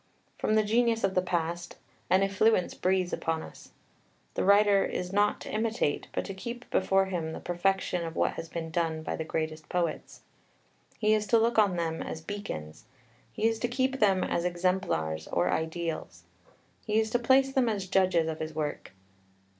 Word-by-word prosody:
From 215 - +1
the 215 - +4
genius 230 +1 +2
of 195 -1 +2
the 185 - +3
past 175 -1 -3 0.3
"an 190 +1 +4
effluence 195 0 +2
breathes 185 -1 0
upon 160 0 -1
us." - - -12 0.6
The - - -1
writer 200 0 +5
is 180 +1 -3
not 205 +1 +2
to - - -7
imitate, 220 -8 0
but - - -2
to 195 - -5
keep 235 +5 -7
before 195 0 +3
him 170 -4 -3
the - - -6
perfection 180 0 0
of 165 -1 -5
what - - +2
has 165 0 -7
been 165 -1 -5
done 160 -1 -1
by - - -3
the 160 - -3
greatest 155 -1 -4
poets. 175 -3 -2 0.8
He 215 0 +3
is 210 -1 +1
to 235 - +5
look 230 0 +3
on 200 -4 +4
them 165 -1 -2
as - - -5
beacons; 120 - -7 0.5
he 215 - -2
is 225 0 -1
to 240 - 0
keep 260 +2 0
them 195 -3 +3
as 170 - -1
exemplars 175 - -1
or 90 +1 +1
ideals. 160 - -3 0.6
He 215 0 0
is 220 0 0
to 245 - +2
place 265 +2 +3
them 255 -3 +3
as 200 -3 -2
judges 185 -3 +2
of 160 -1 -3
his 155 0 -5
work. 150 -9 -4
185 Hz, 185 wpm, -29 LUFS, 160-215 Hz, 0.8 s, writer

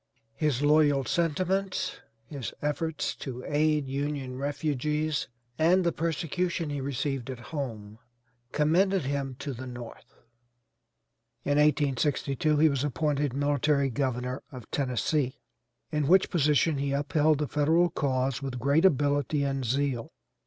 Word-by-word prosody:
His 145 0 0
loyal 145 -2 +4
sentiments, 185 - 0 0.3
his 135 0 -6
efforts 150 +2 -2
to 125 -2 -6
aid 150 -1 +1
Union 140 -1 -3
refugees, 150 +1 -1 0.3
and 180 +4 +4
the 170 - +2
persecution 165 0 -2
he 145 -1 -3
received 135 -1 -2
at 130 - -4 0.2
home 110 -7 -5 0.5
commended 180 +5 +2
him 135 -1 -2
to 140 -1 -5
the 130 +2 -7
North. 120 -2 -10 1.3
In 145 +1 +2
1862 145 0 +2
he 155 +2 +6
was 140 -3 0
appointed 145 -1 0
military 145 -1 +1
governor 125 0 -2
of 125 -5 -9
Tennessee, 130 +1 0 0.5
in 150 -3 0
which 190 +3 +4
position 150 -1 +2
he 140 0 -1
upheld 150 +2 +2
the 150 0 -1
Federal 160 +5 +2
cause 135 -2 0
with 135 -2 -4
great 140 +7 +3
ability 145 -2 +2
and 135 -1 -1
zeal. 130 -1 -1
145 Hz, 125 wpm, -28 LUFS, 135-155 Hz, 1.3 s, he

